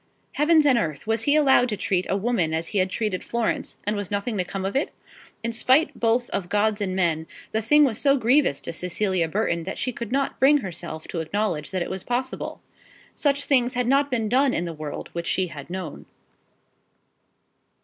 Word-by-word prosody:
Heavens 310 +1 +4
and 260 -4 +5
earth! 155 -8 -3
was 225 0 0
he 285 - +4
to - - +4
be 305 - +5
allowed 265 -3 +4
to 210 - -2
treat 185 -1 0
a 195 - +1
woman 195 -7 0
as 165 +1 -3
he 205 - 0
had 185 0 +2
treated 210 -2 -2
Florence, 235 -1 -2
and 210 +1 0
was 205 -2 -4
nothing 205 +3 -2
to - - +2
come 190 +1 -5
of 195 - -3
it? 275 - +1 0.5
In 230 0 -2
spite 260 +7 +3
both 235 +1 +2
of 175 -3 -3
gods 210 +1 +1
and 185 -2 -1
men, 165 -3 +1 0.2
the 220 - 0
thing 295 +7 +5
was 240 -6 +1
so 280 -1 +4
grievous 250 - +3
to - - -5
Cecilia 180 0 0
Burton, 170 -1 0
that 180 - -5
she 255 - -2
could 235 -1 -6
not 275 +1 -1
bring 280 +3 +6
herself 170 -5 -6
to 170 - -3
acknowledge 170 -2 -2
that 185 -2 -1
it - - -6
was 190 -1 -5
possible. 250 +2 -3 0.5
Such 285 -1 0
things 250 -3 +2
had 250 0 +1
not 275 +3 +3
been 230 -4 0
done 260 +3 +3
in 175 - -1
the 170 - -4
world 155 -1 -6
which 170 0 -4
she 185 -2 +1
had 145 -2 -9
known. 180 -4 -6
215 Hz, 215 wpm, -24 LUFS, 180-250 Hz, 0.5 s, bring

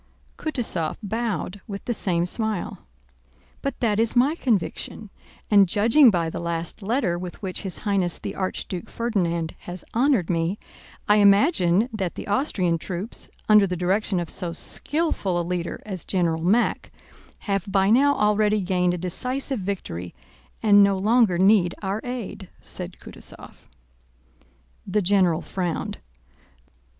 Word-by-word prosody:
Kutúzov 225 - -2
bowed 210 -2 -3
with 200 -1 -7
the 240 - 0
same 175 -5 0
smile. 215 - -2 0.7
"But 275 - -3
that 215 -3 +1
is 230 +1 +2
my 260 +5 +4
conviction, 220 - -2 0.4
and 200 -3 +6
judging 230 - +6
by 170 -5 +1
the - - -5
last 170 +3 -3
letter 195 -5 0
with 180 -1 -7
which 185 -2 -3
His 190 -3 -5
Highness 190 -4 +1
the - - -6
Archduke 185 +1 -4
Ferdinand 175 -8 -1 0.2
has 175 0 -7
honored 240 - +2
me, 170 +2 0 0.5
I 210 - +5
imagine 200 - +4
that 190 -5 -3
the - - -6
Austrian 195 - 0
troops, 185 +7 -6 0.2
under 210 -2 +6
the 180 -1 -3
direction 190 +2 +1
of 170 -2 -4
so 175 -3 -3
skillful 235 - -1
a - - 0
leader 175 -1 -3
as 190 -5 -5
General 170 -4 0
Mack, 210 +7 +1 0.5
have 195 -2 -2
by 195 0 +3
now 285 +4 +5
already 210 0 +2
gained 180 -1 +1
a - - -4
decisive 250 +9 -3
victory 180 - -5 0.5
and 205 -2 +7
no 200 -1 +3
longer 215 -2 +3
need 190 -1 +4
our 200 +3 -2
aid," 235 -6 -6
said 180 0 -7
Kutúzov. - - -10 1.3
The 205 +2 +1
general 180 -3 +2
frowned. 180 -3 -3
195 Hz, 140 wpm, -24 LUFS, 175-220 Hz, 1.3 s, and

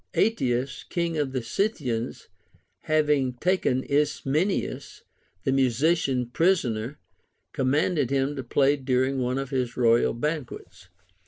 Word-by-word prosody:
Ateas, 130 - 0
king 170 -1 -1
of 145 -3 -1
the 130 -2 -3
Scythians, 125 - -2 0.6
having 150 -4 +2
taken 130 -3 0
Ismenias 150 +5 -1 0.4
the - - +1
musician 135 +1 +2
prisoner, 135 - +1 0.6
commanded 145 +1 +1
him 135 +1 0
to 135 - -5
play 140 +3 +2
during 130 0 0
one 125 +1 -1
of 135 0 -4
his 125 -3 -2
royal 120 -1 +3
banquets. 140 - -5
135 Hz, 110 wpm, -26 LUFS, 125-150 Hz, 0.6 s, royal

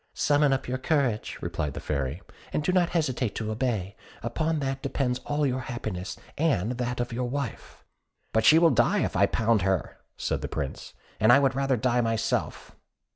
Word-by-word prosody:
"Summon 145 -1 +3
up 135 - 0
your 130 +1 -2
courage," 130 -7 0
replied 75 -2 -3
the - - -4
Fairy, 70 +4 -3 0.3
"and 150 - -1
do 185 - +1
not 180 -2 +3
hesitate 130 - -1
to 110 -1 -3
obey; 110 -5 -2 0.3
upon 155 +8 -1
that 135 -2 -2
depends 135 -2 -1
all 145 0 +1
your 130 -1 0
happiness, 110 -7 -5 0.2
and 125 - +1
that 125 0 -2
of 120 -1 -2
your 125 +1 -2
wife." 140 -3 -5 0.5
"But 110 - +3
she 155 - +7
will 165 -1 +6
die - - +3
if - - -2
I - - +4
pound 110 -2 +2
her," 95 -1 -1 0.2
said - - -2
the - - -3
Prince, 70 -3 -5 0.2
"and 110 +2 +5
I 125 - +8
would 135 -1 +3
rather 135 -1 +1
die 125 +2 +2
myself." 115 -1 -2
125 Hz, 185 wpm, -27 LUFS, 110-140 Hz, 0.5 s, I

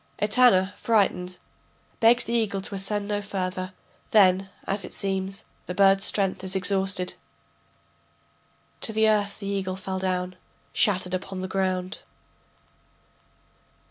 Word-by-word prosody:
[Etana, 210 -3 +4
frightened, 185 -5 +1 0.6
begs 235 +1 +5
the 235 - -4
eagle 215 -4 +1
to 195 - -5
ascend 200 +1 -1
no 205 0 -1
further; 185 -2 -4 0.4
then, 190 -2 +4 0.2
as 195 0 -2
it - - -8
seems, 195 +1 -3 0.2
the 180 - -4
bird's 195 0 +5
strength 195 -2 +1
is 190 0 -2
exhausted.] 190 -1 0 1.7
To 220 - 0
the 220 0 +3
earth 205 -2 +1
the 200 - -8
eagle 195 -2 -2
fell 190 0 -4
down 185 -1 -2 0.4
Shattered 185 -3 +1
upon 185 0 -4
the 185 - -3
ground. 185 -1 -2
195 Hz, 125 wpm, -25 LUFS, 185-205 Hz, 1.7 s, begs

